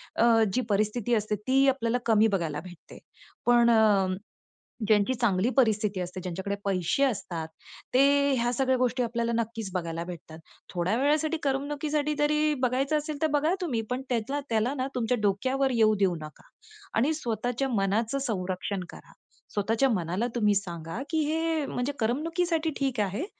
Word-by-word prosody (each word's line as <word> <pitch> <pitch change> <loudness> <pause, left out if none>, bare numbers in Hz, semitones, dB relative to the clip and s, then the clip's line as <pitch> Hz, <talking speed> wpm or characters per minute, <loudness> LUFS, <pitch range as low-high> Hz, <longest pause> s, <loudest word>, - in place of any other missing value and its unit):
अ, - - +3 0.3
जी 255 - +2
परिस्थिती 215 +3 0
असते 215 -1 0
ती 270 +1 +4
आपल्याला 245 -3 0
कमी 220 -1 +4
बघायला 155 -4 -3
भेटते. 180 -1 -13 0.5
पण 240 -1 +5
अ, 210 -4 +4 0.8
ज्यांची 210 +3 +3
चांगली 225 -3 +1
परिस्थिती 215 -5 +2
असते, 180 +1 -5
ज्यांच्याकडे 190 +3 -3
पैसे 190 +6 +1
असतात, 180 -10 -2 0.5
ते - - +6 0.4
ह्या 240 0 +1
सगळ्या 260 +1 +1
गोष्टी 250 0 +1
आपल्याला 235 0 -1
नक्कीच 225 -2 -3
बघायला 170 -2 -3
भेटतात. 165 -2 -9 0.3
थोड्या 180 +3 0
वेळासाठी 305 +3 +2
करमणुकीसाठी 290 +2 -1
जरी 300 +1 +2
बघायचं 265 +4 +1
असेल 300 0 -4
तर 315 - +3
बघा 300 +4 +2
तुम्ही 265 -11 -1
पण 250 +1 -1
त्याच्या 245 +4 -1
त्याला 225 +3 +1
ना 260 -1 -2
तुमच्या 245 0 0
डोक्यावर 260 +7 +1
येऊ 220 -2 +4
देऊ 190 -3 +2
नका 155 0 -11 0.5
आणि 270 +8 +3
स्वतःच्या 245 0 -2
मनाचं 220 +3 0
संरक्षण 190 -5 -3
करा. - - -13 0.4
स्वतःच्या 225 +5 +1
मनाला 185 +1 -1
तुम्ही 210 -3 +3
सांगा 170 -1 -4
की 320 - 0
हे 320 0 0
म्हणजे 260 +2 -2
करमणुकीसाठी 325 +7 0
ठीक 265 -4 -1
आहे, 205 - -2
235 Hz, 150 wpm, -27 LUFS, 200-270 Hz, 0.8 s, ते